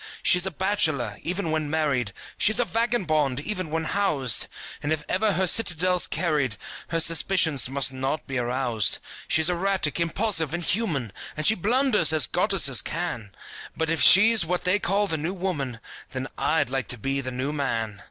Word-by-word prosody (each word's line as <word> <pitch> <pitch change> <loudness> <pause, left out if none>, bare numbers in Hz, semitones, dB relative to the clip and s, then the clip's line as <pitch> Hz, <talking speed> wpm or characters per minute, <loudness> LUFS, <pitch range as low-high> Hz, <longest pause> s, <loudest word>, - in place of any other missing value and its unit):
She's 180 +1 +3
a - - 0
bachelor, 155 - 0
even 180 -1 -3
when 155 -2 -2
married, 145 -8 -1 0.2
She's 215 +1 +2
a 245 - +2
vagabond, 165 - 0
even 185 +1 -4
when 160 +1 -2
housed; 155 - 0 0.3
And 145 - -3
if 155 -1 -1
ever 210 +2 0
her 190 +1 0
citadel's 180 -2 +2
carried 145 - -1 0.3
Her 165 - -2
suspicions 160 -5 +3
must 135 0 -1
not 135 +4 -3
be 135 -2 -3
aroused. 120 -4 0 0.3
She's 160 0 +3
erratic, 180 -3 0
impulsive 170 -2 0
and 175 - -5
human, 160 - -1 0.2
And 155 - -3
she 220 - +6
blunders, 220 - +2
as 155 -5 +3
goddesses - - +3
can; 110 -4 -4 0.5
But 160 0 -1
if 165 - 0
she's 215 +1 +7
what 180 +2 -2
they 185 +3 +1
call 200 +2 0
the 165 -5 -2
New 170 +6 -3
Woman, 145 - -4 0.3
Then 130 +1 -5
I'd 160 -5 0
like 135 -4 -2
to 125 - -3
be 135 +5 -2
the 130 - -5
New 130 +3 -3
Man. 115 -8 -3
160 Hz, 170 wpm, -24 LUFS, 135-185 Hz, 0.5 s, she's